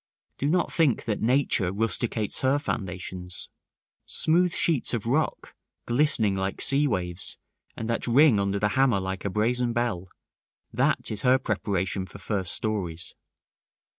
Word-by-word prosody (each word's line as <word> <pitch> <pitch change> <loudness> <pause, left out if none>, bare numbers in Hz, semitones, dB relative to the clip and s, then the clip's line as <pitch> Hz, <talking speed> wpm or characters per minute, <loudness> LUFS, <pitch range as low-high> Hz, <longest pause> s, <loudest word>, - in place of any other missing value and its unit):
Do 140 - 0
not 180 +3 +1
think 155 -10 +2
that 110 -3 -2
nature 115 -6 +2
rusticates 110 +1 -1
her 135 +2 +3
foundations. 90 - -5 0.6
Smooth 175 +2 +2
sheets 160 -8 +1
of 115 - -4
rock, 145 +7 -1 0.3
glistening 120 -6 +2
like 95 0 -2
sea 140 +2 +3
waves, 90 -6 -3 0.4
and 110 - -4
that 115 +1 -2
ring 125 -2 +5
under 100 0 0
the 105 +1 +1
hammer 125 -1 +3
like 95 0 -4
a - - +1
brazen 120 +4 0
bell, 110 -7 -2 0.6
that - - +1
is 105 -1 -3
her 130 +2 +5
preparation 95 -5 -2
for - - -11
first 95 -4 -2
stories. 90 -6 -3
110 Hz, 140 wpm, -26 LUFS, 95-130 Hz, 0.6 s, ring